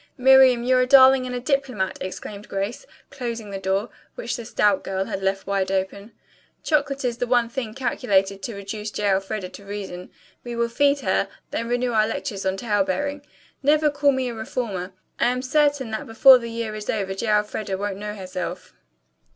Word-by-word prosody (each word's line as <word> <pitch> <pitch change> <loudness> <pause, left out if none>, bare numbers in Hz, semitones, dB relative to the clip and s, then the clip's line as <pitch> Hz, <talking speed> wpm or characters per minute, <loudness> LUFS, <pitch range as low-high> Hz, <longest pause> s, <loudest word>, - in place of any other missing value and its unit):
"Miriam, 260 -2 +6
you're 255 +1 +3
a 250 - +1
darling 260 -1 +7
and 250 - -4
a - - -2
diplomat!" 260 -7 -1
exclaimed 200 +2 -7
Grace, 200 - -4 0.2
closing 235 -6 -5
the 195 - -4
door, 195 +3 -1 0.2
which - - -3
the 235 - -7
stout 210 -4 +2
girl 190 0 -2
had 195 - -4
left 195 0 -1
wide 195 -1 -1
open. 195 +3 -3 0.5
"Chocolate 280 -3 0
is 240 -1 -2
the 245 - -1
one 240 -1 +2
thing 235 -3 -5
calculated 195 -6 0
to 225 +2 -5
reduce 210 +2 -5
J. 205 -1 0
Elfreda 195 0 -2
to 200 - -12
reason. 195 -3 -7 0.3
We 240 -1 -6
will 235 0 0
feed 280 +3 +2
her, - - +1 0.2
then 230 +1 -3
renew 245 0 0
our 215 -1 +3
lectures 200 -3 -4
on 190 0 0
tale 205 -3 +1
bearing. 285 +10 -2 0.4
Never 300 +2 +3
call 285 0 +3
me 260 -1 -1
a 240 - -4
reformer. 220 -5 -4 0.3
I - - +3
am 250 +1 -1
certain 285 -2 +1
that 220 - -4
before 250 +3 +7
the 235 -1 -6
year 230 -1 -4
is 215 -1 -7
over 195 -3 -1
J. 195 +4 -4
Elfreda 210 -2 0
won't 200 0 -3
know 210 +1 -5
herself." 185 -2 -6
225 Hz, 190 wpm, -23 LUFS, 195-255 Hz, 0.5 s, darling